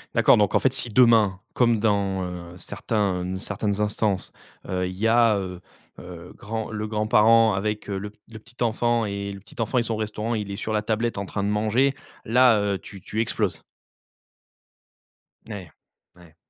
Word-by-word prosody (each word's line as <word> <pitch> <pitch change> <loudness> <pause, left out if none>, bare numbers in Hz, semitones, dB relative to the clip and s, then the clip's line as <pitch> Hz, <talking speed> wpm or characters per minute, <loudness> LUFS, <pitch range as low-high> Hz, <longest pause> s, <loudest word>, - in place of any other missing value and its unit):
D'accord, - - +6
donc 105 -2 +2
en - - +5
fait, 135 - +1
si 125 - -2
demain, 110 -5 +4
comme 120 -2 +3
dans, 100 -3 0
heu, 90 -1 -7
certains, 100 -1 -2
heu, 90 +1 -3
certaines 100 +2 -2
instances, 105 -2 -1 0.3
heu, 90 -1 -1
il 90 0 -7
y 110 +3 +1
a, 115 -2 +4
heu 90 -2 -5 0.4
heu, 90 -1 -10
grand 110 +1 -5
le 110 0 -3
grand-parent 110 +1 +4
avec, 105 +2 -2
heu, 100 -1 -2
le 105 +1 -6
p 105 - -24
le 110 - -9
petit-enfant 120 0 -1
et 100 -1 -4
le 100 - -8
petit 105 +4 -9
enfant, 115 +3 -1
ils 120 - +3
sont 115 - -3
au - - -2
restaurant, 110 +1 -3
il 105 -3 -3
est 100 - -4
sur 110 +2 -4
la 105 - +1
tablette 110 0 -1
en 100 - -4
train 100 - -3
de 100 - 0
manger, 110 +6 +2 0.3
là, 125 0 +5
heu, 100 -1 -1
tu 95 +1 -12
tu 110 +4 -2
exploses? 115 - -1 1.9
N - - -9
ouais, 95 -5 -8 0.4
ouais. 85 -3 -18
105 Hz, 195 wpm, -24 LUFS, 100-115 Hz, 1.9 s, D'accord